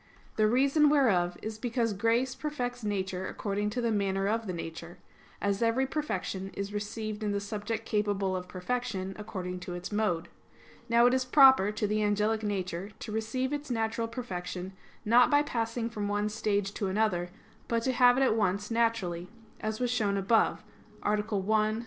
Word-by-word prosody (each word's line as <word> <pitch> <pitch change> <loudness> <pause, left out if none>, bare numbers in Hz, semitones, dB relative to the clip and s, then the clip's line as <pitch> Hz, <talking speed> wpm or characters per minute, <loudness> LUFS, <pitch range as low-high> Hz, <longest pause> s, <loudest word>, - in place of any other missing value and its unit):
The 215 -1 +3
reason 275 +6 +4
whereof 190 -12 +3
is 220 0 -5
because 235 -2 0
grace 230 +6 +1
perfects 245 -5 -4
nature 190 -2 -2
according 205 0 -2
to 245 +4 -2
the 235 -1 +1
manner 195 -2 0
of 225 +1 -1
the - - -1
nature; 170 0 -7 0.4
as 200 0 0
every 230 +3 +2
perfection 210 -9 -3
is 200 +1 -4
received 210 +1 -4
in 210 -1 -1
the 200 - 0
subject 210 +2 -4
capable 205 -3 0
of 180 0 -4
perfection, 195 0 -3
according 185 -4 -5
to 180 -1 -6
its 175 +3 -6
mode. 205 -6 0 0.6
Now 235 +1 +5
it 245 - +5
is 260 0 +2
proper 265 -6 +6
to 210 0 -1
the 210 +1 0
angelic 210 +1 +1
nature 190 -3 -3
to 220 - -7
receive 220 +5 -2
its 290 0 -4
natural 230 -1 -1
perfection 190 -5 -5 0.3
not 235 +3 +6
by 290 0 +4
passing 230 -3 -2
from 210 -3 -3
one 205 +1 0
stage 205 -2 -1
to 200 - -2
another; 190 -3 0 0.4
but 230 -1 0
to 260 - +1
have 245 0 +5
it 270 - +4
at 255 - +3
once 205 0 0
naturally, 220 -7 0 0.3
as 215 0 -3
was 245 -1 0
shown 205 -5 +1
above 215 +4 +2 0.4
(A. - - +2
1; 215 +1 +1
Q. 220 - -3
215 Hz, 180 wpm, -30 LUFS, 195-235 Hz, 0.6 s, proper